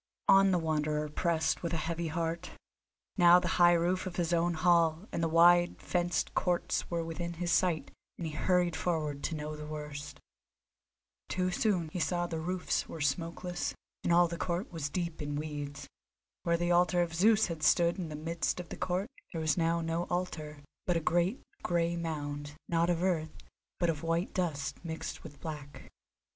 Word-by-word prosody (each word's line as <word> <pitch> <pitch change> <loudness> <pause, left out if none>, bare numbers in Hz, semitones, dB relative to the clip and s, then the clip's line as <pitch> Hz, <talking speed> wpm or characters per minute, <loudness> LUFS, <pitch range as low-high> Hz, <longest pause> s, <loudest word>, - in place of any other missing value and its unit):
On 195 0 +7
the 185 - +3
Wanderer 150 -2 0
pressed 160 +1 0
with 170 -1 -3
a 160 - -2
heavy 170 0 -2
heart; 165 +1 -2 0.7
now 175 -1 +8
the - - -3
high 175 0 +8
roof 175 +2 +1
of 180 - -6
his 175 -1 0
own 170 0 +2
hall 170 +2 +3
and - - -2
the 165 - +2
wide 175 +2 +5
fenced 175 -2 -1
courts 175 -1 0
were 170 -1 -1
within 170 +1 -4
his 170 +1 -2
sight, 170 -6 +1 0.3
and 170 - -4
he 155 - -4
hurried 175 +1 +2
forward 155 -5 -1
to 165 - -2
know 150 0 -4
the 150 0 -7
worst. 150 -2 -7 1.1
Too 185 0 0
soon 180 -4 +1
he 180 - -4
saw 175 +1 0
that 170 - -4
the 160 - -3
roofs 180 +2 -1
were 165 - -7
smokeless, 170 +4 -2 0.3
and - - +1
all 175 +1 +6
the 170 +1 -6
court 175 +2 -2
was 160 -4 -3
deep 170 0 -3
in 145 0 -3
weeds. 145 -1 -5 0.5
Where 170 0 +1
the 175 +1 0
altar 175 0 +4
of 165 -1 -5
Zeus 215 +5 +4
had 165 -3 -5
stood 170 +4 +3
in 170 -3 -3
the 150 - -5
midst 165 +3 -2
of 180 - -7
the - - -6
court 185 +3 -1 0.3
there 165 - -2
was 155 -1 +2
now 170 0 +1
no 165 +1 -1
altar, 155 -5 -4 0.2
but 175 -2 +2
a - - +2
great, 175 - +1 0.2
grey 170 -1 +1
mound, 145 -3 -4
not 170 0 +2
of 175 0 +1
earth, 160 -4 0 0.4
but 175 - +2
of 155 -2 -6
white 165 +2 -1
dust 160 -6 -2
mixed 160 -1 -5
with 145 -3 -11
black. 150 -3 -8
170 Hz, 190 wpm, -31 LUFS, 155-175 Hz, 1.1 s, now